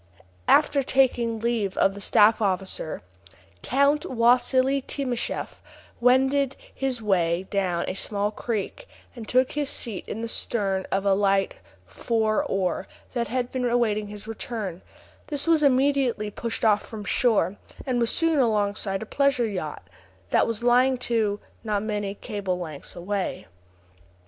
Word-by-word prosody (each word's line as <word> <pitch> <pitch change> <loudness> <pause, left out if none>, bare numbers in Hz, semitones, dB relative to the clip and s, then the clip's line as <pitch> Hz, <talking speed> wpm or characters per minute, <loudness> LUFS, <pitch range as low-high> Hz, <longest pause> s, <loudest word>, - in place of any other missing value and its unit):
After 290 -1 +4
taking 245 -4 +2
leave 225 -5 -1
of 195 - +3
the 200 - -9
staff 215 +3 +4
officer, 185 - -2 0.6
Count 280 +3 +2
Wassili 255 +3 +3
Timascheff 255 -3 -4 0.4
wended 265 +2 +3 0.2
his 260 -4 -3
way 175 -3 +1
down 185 -4 0
to - - -2
a - - -5
small 205 +1 -2
creek, 230 - -4 0.3
and 230 -3 -8
took 255 +1 +3
his 295 -2 -1
seat 220 -7 -2
in 225 - -5
the - - -2
stern 195 -4 -1
of 195 +1 0
a 200 - +4
light 195 0 +2 0.3
four 215 - 0
oar 190 -1 -1 0.3
that 235 -2 -1
had 250 0 -2
been 255 -1 -2
awaiting 215 -3 +1
his 205 0 -9
return; 215 -5 -5 0.5
this 290 -2 -2
was 330 -2 +4
immediately 265 -6 +2
pushed 230 +2 -3
off 210 -1 +4
from 215 -2 -8
shore, 210 -5 +2 0.3
and 255 -3 0
was 235 -1 +1
soon 330 -3 +2
alongside 205 -4 0
a - - -8
pleasure 275 0 +1
yacht, 155 - -5 0.4
that - - +3
was 230 0 -3
lying 250 +2 +4
to, 220 -4 0 0.2
not 210 -2 -1
many 205 -2 -3
cable 195 -3 -3
lengths 155 -5 -8
away. 190 +2 -3
225 Hz, 145 wpm, -25 LUFS, 200-255 Hz, 0.6 s, After